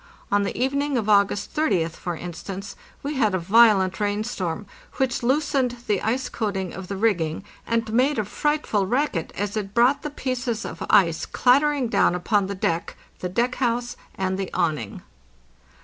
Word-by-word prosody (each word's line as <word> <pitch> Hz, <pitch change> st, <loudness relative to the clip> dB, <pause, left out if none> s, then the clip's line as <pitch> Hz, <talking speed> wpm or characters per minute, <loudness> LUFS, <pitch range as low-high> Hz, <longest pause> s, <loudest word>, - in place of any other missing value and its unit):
On 205 Hz, 0 st, +3 dB
the 200 Hz, -, -3 dB
even 270 Hz, +3 st, +1 dB
ing 285 Hz, -2 st, 0 dB
of 220 Hz, -3 st, -1 dB
August 200 Hz, -1 st, +2 dB
30th, 190 Hz, -, +1 dB
for 175 Hz, +1 st, -5 dB
instance, 185 Hz, +4 st, -7 dB, 0.3 s
we 285 Hz, 0 st, -3 dB
had 215 Hz, -6 st, +2 dB
a -, -, +2 dB
violent 195 Hz, 0 st, +4 dB
rain 205 Hz, 0 st, 0 dB
storm, 185 Hz, -5 st, -3 dB, 0.3 s
which 265 Hz, -2 st, 0 dB
loosened 265 Hz, -1 st, +1 dB
the 205 Hz, -3 st, 0 dB
ice 250 Hz, +4 st, -1 dB
coating 195 Hz, -6 st, -3 dB
of 190 Hz, 0 st, -7 dB
the 195 Hz, -, -4 dB
rigging 185 Hz, -6 st, 0 dB, 0.2 s
and 230 Hz, -1 st, -1 dB
made 265 Hz, +5 st, +3 dB
a 215 Hz, -, 0 dB
fright 295 Hz, +8 st, -1 dB
ful 200 Hz, -3 st, 0 dB
racket 245 Hz, -, 0 dB
as 205 Hz, +1 st, -3 dB
it 200 Hz, -2 st, -4 dB
brought 245 Hz, +4 st, +4 dB
the 300 Hz, -, -4 dB
pieces 250 Hz, -5 st, -3 dB
of -, -, -6 dB
ice 170 Hz, -6 st, +4 dB
clattering 275 Hz, +1 st, +3 dB
down 200 Hz, -, +3 dB
upon 200 Hz, +2 st, +1 dB
the 200 Hz, -, -4 dB
deck, 170 Hz, -2 st, -2 dB, 0.2 s
the 180 Hz, -, -3 dB
deck 235 Hz, +7 st, 0 dB
house, 240 Hz, 0 st, 0 dB, 0.2 s
and 190 Hz, 0 st, -1 dB
the 195 Hz, -, -3 dB
awning. 150 Hz, -11 st, -1 dB
210 Hz, 180 wpm, -24 LUFS, 190-250 Hz, 0.3 s, violent